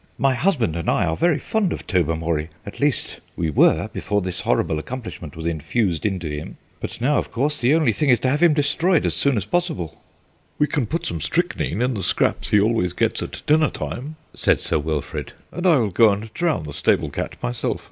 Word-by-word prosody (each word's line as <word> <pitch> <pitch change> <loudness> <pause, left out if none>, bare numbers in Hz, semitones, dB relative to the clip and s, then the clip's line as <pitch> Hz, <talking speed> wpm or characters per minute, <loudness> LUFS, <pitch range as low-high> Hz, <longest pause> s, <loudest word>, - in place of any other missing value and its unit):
"My 135 0 +3
husband 125 - +1
and 85 - -2
I - - +2
are 80 - 0
very 170 - +2
fond 200 +5 0
of - - -5
Tobermory 80 -3 0 0.2
at 100 - -9
least, 145 -2 0 0.2
we 80 -2 -1
were - - +4
before 105 - -1
this 90 -2 -3
horrible 80 - 0
accomplishment 90 - -7
was 80 - -6
infused 85 - 0
into 95 -5 -3
him; 75 0 -6 0.2
but - - -6
now, 145 +5 +2
of - - -5
course, 145 +4 0
the 125 +5 +4
only 155 -9 +3
thing 145 +7 0
is 125 - +5
to 130 - +2
have 145 +4 0
him 170 -3 +5
destroyed 160 +4 +2
as - - +1
soon 140 -4 +2
as 100 - -1
possible." 160 - -2 0.6
"We 150 - +3
can 145 -5 -1
put 165 +8 -3
some 85 -2 -3
strychnine 85 +6 -1
in 125 +1 +1
the 105 - -3
scraps 90 - +1
he 105 - +5
always 100 -4 +1
gets - - 0
at - - -6
dinner 155 0 +4
time," 145 +6 -6 0.2
said - - +2
Sir - - 0
Wilfrid, 75 0 -4 0.2
"and 180 +1 -1
I 170 - +6
will 115 -7 +1
go 110 +5 +6
and 105 +2 -5
drown 165 - 0
the 75 -1 -7
stable - - +1
cat - - -4
myself. - - -2
115 Hz, 215 wpm, -22 LUFS, -, 0.6 s, I